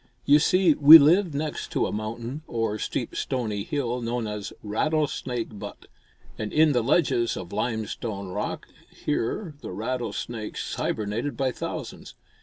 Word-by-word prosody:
You 145 Hz, +1 st, +6 dB
see, 180 Hz, +1 st, +4 dB
we 150 Hz, +3 st, +11 dB
lived 165 Hz, +2 st, +4 dB
next 150 Hz, +1 st, -3 dB
to -, -, +1 dB
a -, -, -3 dB
mountain 115 Hz, +6 st, -5 dB
or 115 Hz, -2 st, -2 dB
steep -, -, -3 dB
stony 110 Hz, -6 st, -2 dB
hill 125 Hz, -2 st, -2 dB
known 120 Hz, 0 st, -2 dB
as 105 Hz, -1 st, -5 dB
Rattlesnake 125 Hz, -2 st, -2 dB
Butte, -, -, -9 dB, 0.5 s
and 105 Hz, -1 st, -3 dB
in 155 Hz, 0 st, +4 dB
the 125 Hz, -3 st, +2 dB
ledges 120 Hz, -3 st, +1 dB
of 90 Hz, -2 st, -8 dB
limestone 110 Hz, -3 st, -3 dB
rock 90 Hz, -, -4 dB, 0.2 s
here 150 Hz, -, -3 dB
the -, -, -7 dB
rattlesnakes 120 Hz, -3 st, -4 dB
hibernated 110 Hz, +5 st, -2 dB
by 130 Hz, -1 st, +1 dB
thousands. -, -, -7 dB
120 Hz, 140 wpm, -25 LUFS, 110-145 Hz, 0.5 s, we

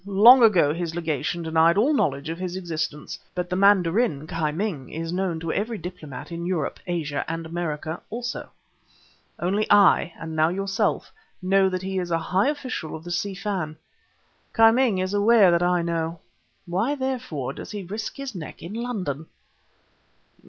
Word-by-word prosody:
Long 225 Hz, +6 st, +8 dB
ago, 180 Hz, -10 st, +5 dB
his 170 Hz, -1 st, -4 dB
Legation 165 Hz, +1 st, -2 dB
denied 160 Hz, +2 st, +3 dB
all 260 Hz, +9 st, +4 dB
knowledge 140 Hz, -, 0 dB
of 165 Hz, +1 st, -4 dB
his 185 Hz, -1 st, -4 dB
existence. 160 Hz, -4 st, -4 dB, 0.2 s
But 180 Hz, 0 st, -3 dB
the -, -, +1 dB
mandarin 195 Hz, -, +3 dB
Ki 155 Hz, -1 st, -1 dB
Ming 160 Hz, -6 st, -3 dB
is 165 Hz, +1 st, -4 dB
known 180 Hz, -3 st, -1 dB
to 165 Hz, 0 st, -2 dB
every 220 Hz, +2 st, -2 dB
diplomat 175 Hz, -6 st, -8 dB
in 170 Hz, 0 st, -5 dB
Europe, 175 Hz, -6 st, -2 dB
Asia 155 Hz, -5 st, -2 dB
and 165 Hz, 0 st, -4 dB
American 160 Hz, -1 st, -4 dB
almost. 240 Hz, +2 st, -4 dB, 1.0 s
Only 200 Hz, +5 st, 0 dB
I, 200 Hz, -4 st, +5 dB
and 160 Hz, -1 st, -6 dB
now 155 Hz, +1 st, +3 dB
yourself, 195 Hz, +2 st, -1 dB, 0.3 s
know 190 Hz, +1 st, +3 dB
that 185 Hz, 0 st, -3 dB
he 190 Hz, 0 st, -2 dB
is 180 Hz, -1 st, -3 dB
a 165 Hz, -, +2 dB
high 185 Hz, -, +1 dB
official 255 Hz, -, -4 dB
of 160 Hz, -, -9 dB
the 175 Hz, -, -7 dB
Si 190 Hz, +3 st, -2 dB
Fan; 185 Hz, -6 st, -3 dB, 0.8 s
Ki 225 Hz, 0 st, +8 dB
Ming 240 Hz, -4 st, +2 dB
is 185 Hz, +1 st, -1 dB
aware 205 Hz, -2 st, +5 dB
that 170 Hz, 0 st, +2 dB
I 175 Hz, -1 st, +2 dB
know. 165 Hz, 0 st, -2 dB, 0.5 s
Why, 195 Hz, +11 st, 0 dB
therefore, 255 Hz, -, -3 dB
does -, -, -9 dB
he 205 Hz, -2 st, -5 dB
risk 210 Hz, +5 st, -5 dB
his 275 Hz, -3 st, -5 dB
neck 170 Hz, -6 st, -8 dB
in 175 Hz, +4 st, -7 dB
London?" 195 Hz, -, -4 dB
180 Hz, 170 wpm, -24 LUFS, 165-205 Hz, 1.0 s, Long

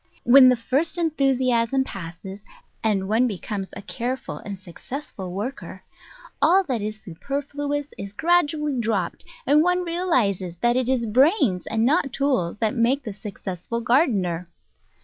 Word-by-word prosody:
When 255 Hz, +1 st, +8 dB
the 250 Hz, -, +4 dB
first 270 Hz, +9 st, -1 dB
en 330 Hz, -2 st, +1 dB
thusiasm 260 Hz, -3 st, +2 dB
passes, 190 Hz, +2 st, -8 dB, 0.4 s
and 200 Hz, -3 st, +1 dB
one 225 Hz, +5 st, +3 dB
becomes 200 Hz, -1 st, -4 dB
a -, -, -8 dB
careful 255 Hz, +5 st, -4 dB
and 200 Hz, -1 st, -7 dB
successful 190 Hz, -, -8 dB
worker, 210 Hz, +9 st, -6 dB, 0.6 s
all 380 Hz, +3 st, +5 dB
that 255 Hz, -, -2 dB
is 215 Hz, +1 st, -4 dB
superfluous 285 Hz, -, -4 dB
is 200 Hz, 0 st, -6 dB
gradually 300 Hz, -, +1 dB
dropped, 215 Hz, -6 st, -2 dB, 0.2 s
and 295 Hz, +3 st, +5 dB
one 360 Hz, +2 st, +2 dB
realises 250 Hz, -, 0 dB
that 240 Hz, 0 st, +3 dB
it 255 Hz, -1 st, 0 dB
is 255 Hz, -3 st, +1 dB
brains 250 Hz, -, +2 dB
and 225 Hz, 0 st, +1 dB
not 285 Hz, 0 st, +2 dB
tools 260 Hz, -11 st, 0 dB
that 220 Hz, 0 st, 0 dB
make 260 Hz, +3 st, +1 dB
the 215 Hz, -, -5 dB
successful 200 Hz, +1 st, -5 dB
gardener. 210 Hz, -, +1 dB
240 Hz, 145 wpm, -23 LUFS, 200-280 Hz, 0.6 s, When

